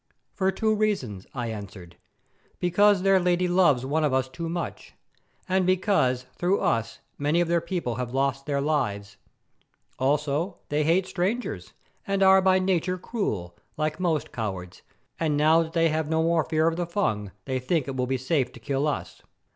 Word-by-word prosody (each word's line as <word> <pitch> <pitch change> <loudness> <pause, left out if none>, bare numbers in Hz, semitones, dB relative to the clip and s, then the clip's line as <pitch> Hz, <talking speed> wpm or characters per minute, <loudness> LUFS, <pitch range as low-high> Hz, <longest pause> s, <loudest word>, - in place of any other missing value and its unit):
"For 190 -1 +1
two 220 +3 +1
reasons," 195 - -1
I 120 -3 -3
answered. 95 -5 -9 0.6
"Because 190 +2 +3
their 195 -1 +5
Lady 180 0 +1
loves 175 -8 +3
one 155 +4 0
of 145 -3 +2
us 130 -1 +1
too 165 +6 -6
much, 170 +1 -5 0.5
and 190 0 +2
because 175 - +2
through 180 +3 +1
us 115 0 -1 0.2
many 145 +4 +2
of 175 - +2
their 170 0 +2
people 170 -9 -3
have 125 -1 -3
lost 135 +1 -1
their 140 -1 0
lives. 105 -10 -1 0.8
Also 150 +6 0
they 150 +1 +1
hate 170 +5 +2
strangers, 195 +9 -3 0.3
and 195 0 +1
are 190 0 +7
by 185 0 +4
nature 185 -1 0
cruel, 105 - -3 0.2
like 155 +1 -1
most 170 -4 0
cowards, 95 -6 -5 0.4
and 155 -3 +1
now 155 +2 +5
that 160 0 -5
they 165 -1 +3
have 155 0 -1
no 160 0 +2
more 165 -1 +2
fear 160 0 +1
of 165 0 0
the 175 -1 -2
Fung, 110 - -1 0.2
they 130 -1 -1
think 145 +3 -1
it 135 - -4
will 125 -1 -1
be 130 +1 0
safe 130 0 0
to - - -12
kill 135 +5 -1
us." 150 - -4
155 Hz, 180 wpm, -26 LUFS, 130-180 Hz, 0.8 s, are